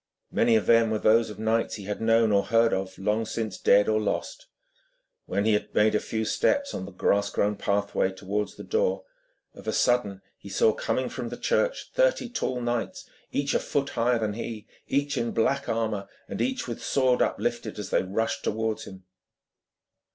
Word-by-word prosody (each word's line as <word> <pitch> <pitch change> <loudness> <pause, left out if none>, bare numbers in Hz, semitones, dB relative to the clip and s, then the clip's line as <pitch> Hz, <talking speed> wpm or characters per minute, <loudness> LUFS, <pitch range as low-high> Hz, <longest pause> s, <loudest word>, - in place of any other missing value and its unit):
Many 115 - +3
of 110 - +2
them 115 -1 +5
were 110 - 0
those 110 +2 +3
of 105 - -8
knights 110 +1 0
he 105 - -8
had 105 +2 -4
known 115 0 +4
or 100 -1 +3
heard 115 +2 +3
of, 95 0 -3
long 105 +3 0
since 110 -3 -4
dead 100 +1 +5
or 110 0 +2
lost. 105 - -3 0.8
When 100 - 0
he 110 - +4
had 105 - -2
made 105 +1 +4
a 105 - +3
few 110 -1 -3
steps 280 - +1
on 95 - -4
the 100 - -9
grass 100 +2 +1
grown 105 +1 0
pathway 100 -1 0
towards 100 +2 -3
the - - -9
door, 480 +2 0 0.5
of - - -13
a - - +1
sudden 105 -6 +1 0.2
he - - -11
saw, 455 -2 +3
coming - - -1
from - - -5
the - - -6
church, - - 0
thirty - - +2
tall 130 - -2
knights, 120 -1 -3 0.2
each 140 0 0
a - - +3
foot 140 -1 -1
higher 120 +1 +1
than 110 -2 -1
he, 110 -1 -6 0.2
each 140 +1 0
in 115 - -2
black 140 +5 +1
armour, 110 -3 -1 0.2
and - - -4
each 260 - -1
with 120 - -6
sword 130 -2 +2
uplifted, 120 -2 -1
as 105 -2 -6
they - - +3
rushed 100 +5 -2
towards 110 0 -2
him. 95 -1 -11
110 Hz, 195 wpm, -26 LUFS, 105-125 Hz, 0.8 s, them